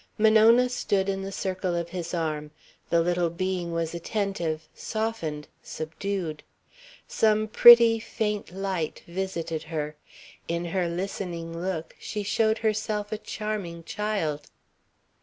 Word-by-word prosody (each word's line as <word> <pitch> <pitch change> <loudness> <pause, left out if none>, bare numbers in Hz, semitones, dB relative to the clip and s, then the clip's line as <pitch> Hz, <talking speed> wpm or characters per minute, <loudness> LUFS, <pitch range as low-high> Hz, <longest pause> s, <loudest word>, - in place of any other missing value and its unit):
Monona 220 +3 +6
stood 200 -6 0
in 195 0 -1
the 195 0 -5
circle 185 -2 -2
of 170 0 -2
his 175 -2 -5
arm. 155 -3 -2 0.4
The 170 - +4
little 175 0 +1
being 180 0 -2
was 165 -1 -2
attentive, 170 -3 -2
softened, 215 -10 -3
subdued. 160 0 -4 0.7
Some 215 0 +2
pretty, 235 0 +8
faint 210 -3 -3
light 185 -4 -3
visited 170 -3 -3
her. 155 -2 -4 0.5
In 170 +1 -2
her 175 +1 0
listening 170 -2 -4
look, 175 -3 -3
she 210 -1 -4
showed 220 +2 +2
herself 215 -1 -1
a 215 - -1
charming 205 -7 -4
child. 200 -7 -2
185 Hz, 120 wpm, -27 LUFS, 165-210 Hz, 0.7 s, pretty